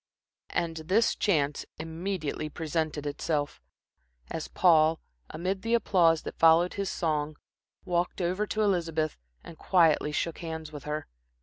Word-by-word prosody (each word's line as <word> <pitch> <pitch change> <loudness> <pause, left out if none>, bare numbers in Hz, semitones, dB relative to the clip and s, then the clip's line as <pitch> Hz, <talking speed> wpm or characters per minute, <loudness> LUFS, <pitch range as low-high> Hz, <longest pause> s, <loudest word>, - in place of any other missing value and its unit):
And 165 -1 -2
this 185 +9 +2
chance 150 -8 +1
immediately 160 -1 -4
presented 155 -1 -2
itself, 145 0 -2 0.7
as 160 - -4
Paul, 160 -3 +4 0.3
amid 190 +3 -3
the 230 +3 +1
applause 170 -8 +3
that - - -7
followed 165 +2 +5
his 200 -1 -2
song, 155 -2 -1 0.5
walked 175 +1 -1
over 185 +4 0
to 215 +1 0
Elizabeth 165 - 0 0.2
and 160 - -12
quietly 165 -5 +3
shook 165 +2 -2
hands 160 -2 -6
with 145 -2 -9
her. 150 +1 -3
165 Hz, 130 wpm, -28 LUFS, 155-180 Hz, 0.7 s, followed